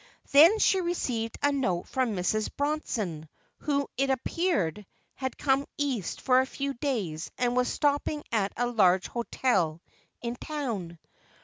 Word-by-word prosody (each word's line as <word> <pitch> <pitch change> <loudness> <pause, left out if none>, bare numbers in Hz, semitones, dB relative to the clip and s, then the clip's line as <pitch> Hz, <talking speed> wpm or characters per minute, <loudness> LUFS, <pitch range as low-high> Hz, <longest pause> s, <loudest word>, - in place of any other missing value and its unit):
Then 325 +10 +8
she 385 -3 +3
received 245 -10 -2
a 285 - +4
note 195 -11 -1
from 255 -5 0
Mrs. 210 +4 0
Bronson, 215 - -2 0.3
who, 280 -2 0
it 275 +1 +1
appeared, 260 - 0 0.3
had 260 -2 -4
come 275 0 +1
East 265 -10 -2
for 255 -1 +4
a - - -1
few 275 0 -3
days 215 - -2
and 245 0 +1
was 250 0 +2
stopping 290 +1 0
at 205 -3 +1
a 245 - +1
large 190 -6 +3
hotel 195 -9 0 0.4
in 235 0 -4
town. 230 - -4
250 Hz, 140 wpm, -28 LUFS, 200-280 Hz, 0.4 s, Then